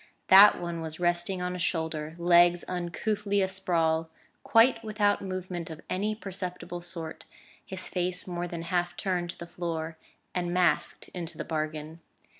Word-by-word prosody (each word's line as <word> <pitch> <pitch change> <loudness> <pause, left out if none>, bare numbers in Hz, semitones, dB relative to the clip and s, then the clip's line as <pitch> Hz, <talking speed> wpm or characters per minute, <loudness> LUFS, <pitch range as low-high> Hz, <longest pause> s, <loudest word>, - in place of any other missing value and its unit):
That 200 +2 +9
one 170 -1 -4
was 160 0 -6
resting 175 +1 0
on 180 0 -2
a - - -5
shoulder, 160 -2 -2
legs 175 0 +5
uncouthly 200 +4 -1
a - - +1
sprawl, 165 -4 0 0.3
quite 230 0 +4
without 210 -2 +1
movement 185 -3 -4
of 160 -1 -8
any 210 +3 0
perceptible 180 -3 -6
sort; 170 -2 -5 0.4
his 190 -1 -5
face 180 0 -2
more 175 -1 -3
than 170 -1 -5
half 175 +1 -1
turned 180 -3 -1
to - - -6
the 170 - -7
floor, 165 -2 -4 0.4
and 175 -1 -1
masked 180 -1 +1
into 170 -2 -6
the - - -4
bargain. 155 0 -4
175 Hz, 155 wpm, -28 LUFS, 165-185 Hz, 0.4 s, That